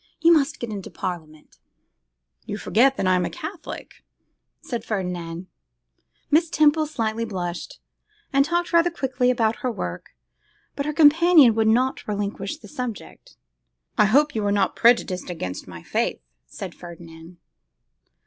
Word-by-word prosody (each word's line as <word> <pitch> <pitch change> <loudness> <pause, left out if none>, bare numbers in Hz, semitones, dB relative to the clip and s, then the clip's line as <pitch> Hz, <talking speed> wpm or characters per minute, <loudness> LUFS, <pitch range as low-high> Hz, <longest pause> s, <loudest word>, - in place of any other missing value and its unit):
You 335 +1 +6
must 300 -2 +1
get 235 -2 -5
into 200 -3 -6
parliament.' 155 -4 -7 0.9
'You 205 - -4
forget 260 +6 +3
that - - -1
I 185 - +4
am 180 -1 +2
a - - -2
Catholic,' 345 0 -8 0.6
said 235 -3 -5
Ferdinand. 180 -4 -4 0.9
Miss 320 +2 +4
Temple 310 0 +3
slightly 225 -6 -2
blushed, 180 -5 -5 0.5
and 275 0 +5
talked 345 +4 -1
rather 335 +1 +5
quickly 260 -6 0
about 230 -3 +1
her 250 - -2
work; 90 - -6 0.6
but 280 +1 -3
her - - 0
companion 310 -3 +6
would 220 0 +1
not 255 +4 +1
relinquish 205 -1 -3
the 210 - -14
subject. 235 -1 -7 0.6
'I 210 - +7
hope 290 +8 +3
you 220 - -2
are 205 - +1
not 200 -1 +1
prejudiced 230 -6 +2
against 95 - -5
my 85 -2 -10
faith,' - - -2 0.2
said - - -8
Ferdinand. 170 0 -12
225 Hz, 145 wpm, -23 LUFS, 180-285 Hz, 0.9 s, I